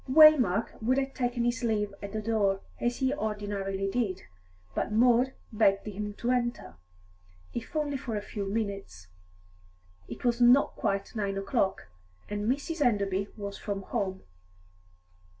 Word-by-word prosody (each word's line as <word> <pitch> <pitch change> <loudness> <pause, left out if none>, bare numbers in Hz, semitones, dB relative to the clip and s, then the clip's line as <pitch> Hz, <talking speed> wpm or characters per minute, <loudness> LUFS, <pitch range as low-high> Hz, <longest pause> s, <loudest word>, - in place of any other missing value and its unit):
Waymark 260 - +6
would 250 +4 +2
have 270 0 -1
taken 245 -1 -1
his 240 +1 0
leave 210 -3 0
at 200 -1 -6
the 215 0 -3
door, 205 -3 +1 0.2
as 240 0 0
he 265 +1 +1
ordinarily 205 -5 -2
did, 195 -3 -1 0.5
but - - -2
Maud 245 +3 +4 0.2
begged 200 -2 +3
him 210 0 -5
to 240 +3 -1
enter, 240 - -1 0.8
if 240 +6 -6
only 290 -2 0
for 245 -4 -4
a 205 - -1
few 205 -2 -5
minutes. 195 - -4 1.0
It - - -8
was 240 0 +2
not 245 +3 +6
quite 200 +3 -2
nine 200 -2 -1
o'clock, 195 - 0 0.4
and 210 +1 -2
Mrs. 295 +3 -1
Enderby 200 -5 +1
was 200 -1 -6
from 200 -2 -4
home. 190 -3 -3
215 Hz, 145 wpm, -29 LUFS, 200-245 Hz, 1.0 s, Waymark